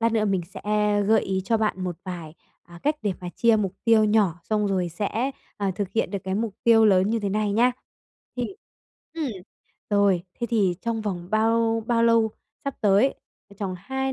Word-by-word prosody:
lát 230 0 +2
nữa 215 -2 +2
mình 195 -3 +1
sẽ 185 - -11 0.5
gợi 220 -1 +5
ý 190 -1 -2
cho 225 +1 +2
bạn 200 -4 -1
một 175 -2 -3
vài, 170 -4 -7 0.3
à, 170 0 -14
cách 300 +1 +1
để 205 -3 0
mà 180 - -5
chia 230 +2 +3
mục 195 -3 -1
tiêu 225 -2 +5
nhỏ, 205 -6 +2
xong 210 -1 0
rồi 185 -3 0
sẽ, 215 +9 -2 0.3
à, 200 -2 -1
thực 200 -3 -2
hiện 225 - 0
được 200 - -2
cái 190 0 -2
mục 215 -1 -2
tiêu 225 -1 +6
lớn 190 +1 +4
như 230 -1 0
thế 200 - -1
này 210 0 0
nha. 245 +4 +4 0.6
Thì 245 - -1 0.7
ừm, 310 -6 -2 0.6
rồi, 200 -4 +3 0.2
thế 235 - 0
thì 200 -6 +2
trong 230 -1 -1
vòng 180 -4 -4
bao 225 +1 +2
bao 230 -1 +2
lâu 230 -1 +4 0.3
sắp 280 -1 -2
tới, 210 +6 +4 0.3
ờ, 200 - -16
tròng 190 -3 -3
2 265 +7 -2
210 Hz, 205 wpm, -25 LUFS, 190-230 Hz, 0.7 s, tiêu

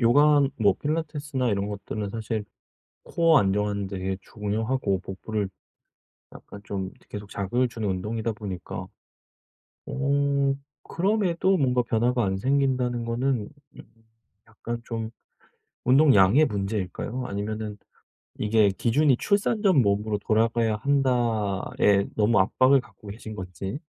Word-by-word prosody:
요가 145 +5 +5 0.2
뭐 100 -3 +4
필라테스나 150 -4 -2
이런 100 0 -1
것들은 105 0 -5
사실 110 -1 -3 0.6
코어 165 -2 +4
안정하는 100 -1 0
데에 95 -1 -3
중요하고 105 0 -2
복부를 100 +2 -4 0.8
약간 100 - -12
좀 95 -1 -3
이렇게 - - -24
계속 105 -1 -8
자극을 120 +6 0
주는 115 -3 -4
운동이다 110 +5 -2
보니까. 100 -5 -6 1.0
어 140 0 +1 0.3
그럼에도 190 -1 +1
뭔가 125 -6 +2
변화가 120 0 +1
안 95 0 0
생긴다는 130 0 0
거는 120 -1 -1 0.3
음 - - -10 0.6
약간 115 +2 -6
좀 115 -1 -4 0.7
운동량의 135 -1 +5
문제일까요? 105 +3 -3
아니면은 105 +1 -4 0.6
이게 105 -1 +3
기준이 130 +7 +2
'출산 205 +2 +1
전 185 -10 +5
몸으로 105 0 0
돌아가야 115 0 +1
한다.'에 110 -6 +1
너무 110 +1 +3
압박을 130 +8 +4
갖고 110 - -16
계신 110 +1 -8
건지. 95 - -6
115 Hz, 285 characters per minute, -25 LUFS, 100-135 Hz, 1.0 s, 요가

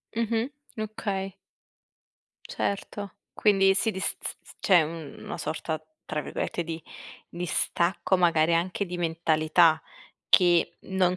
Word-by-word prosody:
Mh-mh, 230 +2 0 0.3
okay. 200 -3 -3 1.1
Certo. 200 0 -3 0.2
Quindi 195 -2 +4
sì 220 +3 +1
di 190 - -5
s 190 - -1
s - - -5
s - - -16
c'è 185 -4 +5
una 155 -2 -7
sorta, 155 +1 -3 0.2
tra - - -2
virgolette, 175 - -3
di 165 0 -5 0.5
"distacco" 175 +2 0
magari 170 -2 +4
anche 180 +4 0
di 180 -1 -5
mentalità 160 -1 +3 0.5
che 175 -2 +5
non 185 -1 +1
175 Hz, 120 wpm, -27 LUFS, 165-195 Hz, 1.1 s, c'è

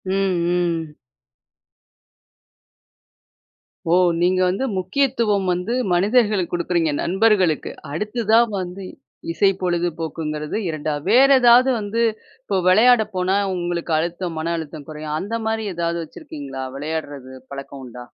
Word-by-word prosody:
ம், 185 - -2 0.8
ம். 150 - -19 2.9
ஓ! - - +4 0.3
நீங்க 185 +1 +2
வந்து 190 +9 -1
முக்கியத்துவம் 210 -1 0
வந்து 180 +6 -2 0.2
மனிதர்களுக்கு 205 0 +2
குடுக்குறீங்க 170 -2 0
நண்பர்களுக்கு. 190 -3 +2 0.2
அடுத்ததா 215 +6 +1 0.2
வந்து, 185 +1 -6 0.5
இசை 195 +3 +3
பொழுதுபோக்குங்கிறது 165 -3 -2
2வது. 150 -2 -3
வேற 270 +3 +6
எதாவது 245 +2 +6
வந்து, 215 +3 -1 0.4
இப்போ 200 -7 -1
விளையாட 230 +5 +6
போனா 185 +2 +1 0.2
உங்களுக்கு 175 -1 -2
அழுத்தம் 170 0 -3
மன 165 +2 -2
அழுத்தம் 155 -2 -8
குறையும், 155 0 -4
அந்த 205 +6 -4
மாரி 220 0 -1
ஏதாவது 170 0 -1
வச்சிருக்கீங்களா? 140 -3 -8
விளையாடுறது 145 -3 -5 0.2
பழக்கம் 140 0 -8
உண்டா? 125 0 -10
175 Hz, 110 wpm, -21 LUFS, 155-210 Hz, 2.9 s, வேற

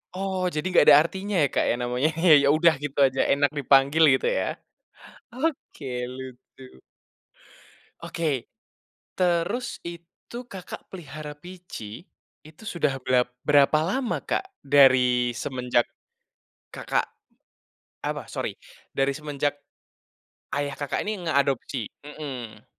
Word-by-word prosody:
Oh, 190 -1 -1
jadi 150 -1 -4
nggak - - +7
ada 145 - +10
artinya 195 +3 -4
ya, - - +4
Kak, - - +2
ya, - - +3
namanya, 125 +5 0 0.3
ya 140 - +2
udah 170 0 +5
gitu 145 -1 -5
aja 130 0 +1
enak 145 0 +2
dipanggil 140 +4 +4
gitu - - 0
ya? - - 0 0.9
Oke 265 - -3 0.3
lucu. 130 0 -11 1.4
Oke. 150 -7 -2 0.7
Terus 180 +7 0
itu 170 +8 -10
Kakak 190 -6 -9
pelihara 150 -3 -8
Pici, 175 - -10 0.4
itu 155 +7 -15
sudah 140 -6 0
berap 125 -1 +1
berapa 145 +1 +4
lama, 230 +9 -1
Kak, 385 - -2 0.2
dari 125 -3 +4
semenjak 125 -1 -1 0.8
Kakak - - -1 0.9
apa, - - -3
sorry. - - -3 0.4
Dari 135 0 +2
semenjak 145 0 -3 1.0
ayah 145 -1 -2
Kakak 145 +7 -3
ini 210 -4 -3
ngeadopsi? 140 -6 0 0.2
Mhm. 140 -6 -8
145 Hz, 115 wpm, -25 LUFS, 130-175 Hz, 1.4 s, ada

